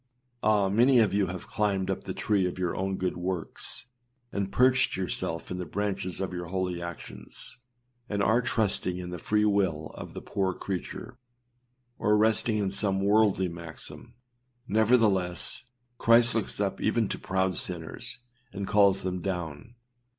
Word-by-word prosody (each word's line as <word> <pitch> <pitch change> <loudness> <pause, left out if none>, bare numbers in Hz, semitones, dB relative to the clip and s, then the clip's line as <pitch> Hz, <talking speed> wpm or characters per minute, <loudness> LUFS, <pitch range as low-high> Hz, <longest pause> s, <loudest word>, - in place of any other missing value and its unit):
Ah! 105 -2 +3
many 120 +7 +5
of 110 -4 +4
you 100 -1 +2
have 90 0 -6
climbed 100 -3 0
up - - -4
the - - -3
tree 100 -3 +1
of 90 - -5
your 90 -2 -1
own 95 0 -1
good 90 -1 -1
works, 90 -1 -4 0.5
and 100 -1 -2
perched 130 -5 +4
yourselves 90 -3 -3
in 90 - -3
the - - -2
branches 100 -3 -2
of 95 -1 -3
your 90 -1 -4
holy 90 -1 -2
actions, 85 +7 -7 0.5
and 100 -1 0
are 115 +5 +4
trusting 105 -6 0
in 90 -1 -6
the 90 - -5
free 105 0 +2
will 95 -7 +1
of - - -9
the - - -5
poor 95 -2 -1
creature, 95 -3 -5 0.8
or 105 0 +3
resting 110 +1 +3
in 100 -2 0
some 95 -1 +1
worldly 100 -1 +3
maxim; 85 +7 -9 0.5
nevertheless, 105 -5 +2 0.3
Christ 115 +1 +5
looks 110 -3 -1
up 100 -2 -1
even 110 0 +2
to - - -3
proud 95 -1 0
sinners, 85 +5 -5 0.3
and 100 0 -4
calls 100 -2 +4
them 90 -1 -2
down. 90 +3 -4
95 Hz, 160 wpm, -28 LUFS, 90-105 Hz, 0.8 s, many